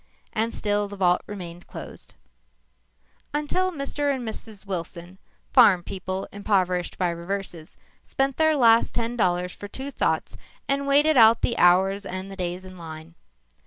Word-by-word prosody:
And 225 +1 0
still 205 -2 -1
the 200 - -8
vault 180 -2 +2
remained 175 -4 -8
closed. - - -10 1.2
Until 365 +6 0
Mr. 285 -2 -2
and 255 -4 -3
Mrs. 215 -2 -7
Wilson, 180 -1 -6 0.3
farm 180 -3 +6
people 190 +1 -5
impoverished 185 -3 0
by 180 -2 +1
reverses, 170 -1 -6 0.3
spent 270 0 -1
their 315 -1 +3
last 230 -4 +4
ten 235 0 -1
dollars 180 -4 +1
for 205 - -9
two 265 +7 -6
thoughts - - -1 0.3
and 280 0 0
waited 295 +2 +4
out 225 -1 +7
the 235 - +1
hours 190 +2 +4
and 190 0 -6
the - - -7
days 180 0 -4
in 185 -1 -11
line. 160 0 -9
200 Hz, 150 wpm, -25 LUFS, 180-240 Hz, 1.2 s, out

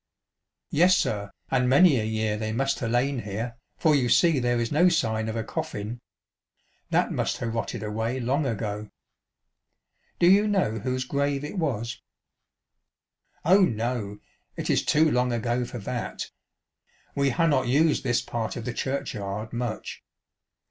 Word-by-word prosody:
" - - -58 0.3
Yes, 180 +4 +5
sir, 100 - -1 0.2
and 125 -1 +2
many 140 0 +6
a - - -1
year 110 -1 -1
they 110 0 -3
must 135 +4 0
ha' - - -3
lain 125 +3 +1
here, 115 +2 -5 0.2
for 155 - +3
you 125 -4 +2
see 165 +2 +4
there 120 -1 +1
is 115 -1 -1
no 170 +5 +5
sign 110 -10 0
of 110 - -4
a 115 - -1
coffin. 110 +2 -5 0.9
That - - +2
must - - -1
ha' - - -6
rotted 115 -2 -3
away 110 +4 -2
long 135 +4 0
ago." 105 -2 -3 0.7
" - - -46
Do - - +4
you 200 +3 +6
know 185 - +1
whose 130 +4 -2
grave 140 +1 -1
it 155 +6 -4
was? 120 -6 -2 0.5
" - - -59
" - - -39
Oh, 190 +5 +6
no, 115 - -1 0.4
it - - -1
is - - +2
too 155 0 +3
long 125 0 +2
ago 120 +1 -1
for 120 - -7
that. 120 +2 -5 0.8
We 140 -1 +2
ha' 165 +5 +2
not 135 -5 +2
used 150 +5 +3
this 120 -2 +1
part 115 -2 -3
of 115 - -6
the 125 - -3
churchyard 110 -6 -3
much. 120 -2 -4
120 Hz, 170 wpm, -26 LUFS, 110-140 Hz, 0.9 s, many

